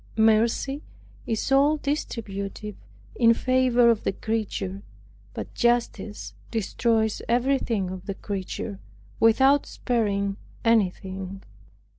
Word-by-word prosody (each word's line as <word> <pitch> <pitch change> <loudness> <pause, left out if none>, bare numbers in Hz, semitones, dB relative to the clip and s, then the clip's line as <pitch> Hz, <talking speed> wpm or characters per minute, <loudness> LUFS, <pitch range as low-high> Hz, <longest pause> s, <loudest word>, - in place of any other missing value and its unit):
Mercy 225 +6 +3 0.5
is 225 +4 -1
all 285 +3 +5
distributive 210 -8 -4 0.4
in 230 -1 +5
favor 255 -1 +3
of 225 - -1
the - - +1
creature, 200 -2 -3 0.5
but - - -6
justice 235 -3 0 0.2
destroys 225 0 0
everything 235 -6 +1
of 185 -1 -8
the 195 - -3
creature, 195 +1 -5 0.4
without 265 +5 +5
sparing 200 -5 -1 0.3
anything. 195 -3 0
225 Hz, 95 wpm, -25 LUFS, 200-245 Hz, 0.5 s, all